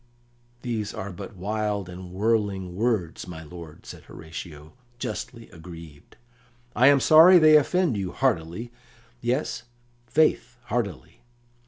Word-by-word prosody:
"These 110 -4 -3
are 100 +1 -5
but 95 +4 -9
wild 105 0 -2
and 90 0 -9
whirling 100 -3 -1
words, 105 -7 -1
my 80 -2 -8
lord," 80 -1 -12
said - - -11
Horatio, 80 -1 -10 0.2
justly 115 -1 -6
aggrieved. 80 -3 -13 0.6
"I 130 - +5
am 140 0 +6
sorry 160 +8 +8
they 155 -2 +7
offend 160 -1 +3
you, 95 -3 -3
heartily 85 +9 -1 0.5
yes, 125 +5 -1 0.5
faith, 125 -2 +1
heartily!" 100 - -4
105 Hz, 120 wpm, -25 LUFS, 85-120 Hz, 0.6 s, sorry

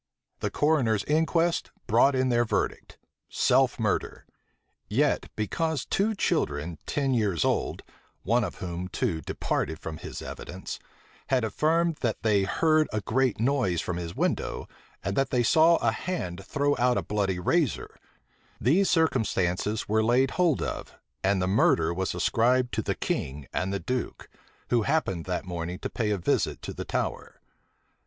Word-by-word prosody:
The - - -1
coroner's 130 -9 +2
inquest 165 +2 +1 0.2
brought 130 +5 +4
in 130 0 +2
their 120 -1 +3
verdict, 115 - -2 0.3
self - - +2
murder; - - -1 0.6
yet - - +1
because 155 +7 -1
two 215 +3 +1
children 80 - -1
ten 135 -2 0
years 105 -9 +1
old - - -1 0.4
(one 120 +4 +2
of - - -4
whom, 90 0 -5
too, 80 -3 -2
departed 80 - -2
from 80 0 -6
his - - -7
evidence) 95 +2 -7 0.5
had 130 -3 +2
affirmed 160 +9 +1
that 115 -4 -2
they 105 -3 +3
heard 155 +8 +3
a 110 - -1
great 130 +2 +1
noise 120 - +1
from 90 +1 -3
his 85 -1 -5
window, - - -1 0.4
and 100 +1 -2
that 135 +2 +1
they 125 -1 +2
saw 160 +7 +5
a - - +1
hand 95 - -4
throw 145 +7 0
out 125 0 +3
a - - 0
bloody 100 -3 -1
razor, 145 - 0 0.6
these 175 - +3
circumstances 110 - +1
were 110 +1 +2
laid 125 +4 +3
hold 175 -6 +2
of, - - -5 0.3
and 95 0 +2
the 90 - 0
murder 85 -4 +3
was 95 +2 -2
ascribed 125 +2 +2
to - - 0
the - - -2
king 70 +1 -3
and 95 +1 -1
the 100 - -1
duke, 125 +2 -4 0.4
who 120 -1 +4
happened 110 - 0
that 90 +1 -3
morning 90 0 -4
to - - -5
pay 110 -3 -1
a 105 - +1
visit 90 - 0
to - - -5
the - - -6
Tower. - - -3
115 Hz, 160 wpm, -27 LUFS, 95-140 Hz, 0.6 s, saw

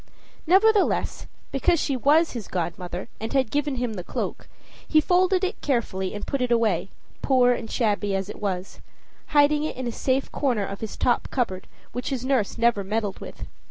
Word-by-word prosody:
Nevertheless, 405 +4 +3 0.2
because 295 +5 +2
she 275 - 0
was 300 +6 +4
his 230 -5 -6
godmother, 175 +1 -4
and 225 +4 -4
had 260 -5 +2
given 290 -1 0
him 245 -2 -2
the 180 -4 -5
cloak, - - -4 0.4
he 310 - +5
folded 365 +3 +3
it 375 +3 -2
carefully 210 -8 -1
and 205 - -5
put 275 - -2
it 250 - +1
away, 220 -6 +2 0.3
poor 250 -2 +4
and 225 -2 -5
shabby 205 -4 0
as 195 0 -2
it 210 - -9
was, 190 -2 -3 0.5
hiding 295 0 +4
it 310 - -3
in 255 - -3
a 240 - -1
safe 265 +3 -1
corner 245 -8 0
of 195 +1 -7
his 220 - -5
top 245 - +1
cupboard, 190 -8 -2 0.2
which 245 - -4
his 260 -3 -3
nurse 260 -7 +1
never 230 -3 +2
meddled 205 0 -2
with. - - -8
245 Hz, 185 wpm, -25 LUFS, 205-285 Hz, 0.5 s, he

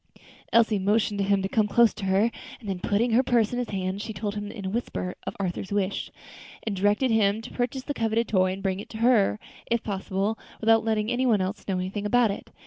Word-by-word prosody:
Elsie 225 -2 +4
motioned 205 +1 +1
to - - +2
him 195 0 +2
to - - 0
come 215 +1 +2
close 235 +2 +4
to 200 - -6
her, 195 +5 +3 0.3
and 220 - -11
then 190 -2 -2
putting 220 +6 +1
her 235 +3 +5
purse 235 -4 +2
into - - -1
his 195 - -2
hands, 185 +2 -2
she 220 0 -5
told 205 +1 -3
him 205 0 -5
in 205 -4 -8
a - - -1
whisper 200 -5 -3
of - - -3
Arthur's 190 0 -3
wish, 200 -1 -1 0.5
and 215 -3 -2
directed 205 +6 +2
him 215 -1 +3
to 225 - -9
purchase 250 +1 -2
the 285 - -3
coveted 225 -2 0
toy, 185 -2 +2
and 190 +1 -6
bring 190 -1 0
it 205 - -9
to 220 - -7
her, 225 -3 +3 0.3
if 235 -1 +1
possible, 195 +1 -2 0.2
without 225 0 +4
letting 220 0 0
any 255 +1 +1
one 220 -4 +4
else 190 +3 -3
know 195 - 0
anything 195 +3 -3
about 240 -1 +3
it. - - -7
210 Hz, 235 wpm, -26 LUFS, 195-225 Hz, 0.5 s, her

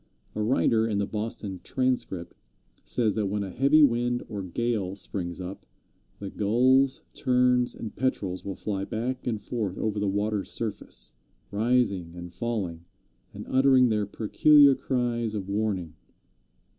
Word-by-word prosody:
A 110 - -3
writer 110 -1 +2
in 105 -3 -1
the 100 - +1
Boston 105 -3 -4
Transcript 125 -10 -1 0.5
says 110 -4 0
that 105 -1 -1
when 100 +1 -1
a 95 - -6
heavy 140 +7 +5
wind 120 -2 +2
or 105 -2 -5
gale 100 0 -2
springs 90 -2 -4
up, 95 +2 -7 0.5
the 100 -1 -7
Gulls, 130 +6 +3
Terns 125 -1 +2
and 110 - -7
Petrels 100 -8 -2
will 100 -1 -5
fly 100 -2 -3
back 125 +6 -3
and 110 -3 -1
forth 105 -3 -3
over 105 -1 -1
the 100 - 0
water's 100 +1 -1
surface, - - -5 0.4
rising 100 -6 +1
and 90 0 -8
falling, 95 -7 -3 0.5
and - - -8
uttering 130 -1 +5
their 105 -2 0
peculiar 140 +7 +5
cries 120 -4 -1
of 100 -2 -4
warning. 100 -5 -1
110 Hz, 145 wpm, -27 LUFS, 100-125 Hz, 0.5 s, heavy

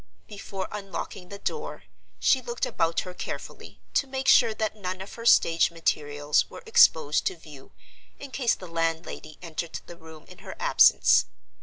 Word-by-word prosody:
Before 200 -2 -6
unlocking 195 -2 -7
the 200 - -8
door, 450 - -5 0.4
she 260 - +3
looked 240 0 -3
about 165 -1 0
her 180 - -8
carefully, - - -8
to 280 - +1
make 265 0 -4
sure 235 -3 +6
that 215 -1 -2
none 185 -3 -5
of 190 +2 -9
her 230 0 -5
stage 165 -6 +5
materials 145 -3 0
were - - -11
exposed 160 - +4
to 185 - -2
view 150 -5 -14 0.5
in 280 -1 -10
case 250 -3 +1
the 185 - -11
landlady 165 -2 -3
entered 165 0 -5
the 175 - -11
room 160 -2 -14
in - - -14
her - - -9
absence. - - +5
180 Hz, 165 wpm, -26 LUFS, 160-225 Hz, 0.5 s, sure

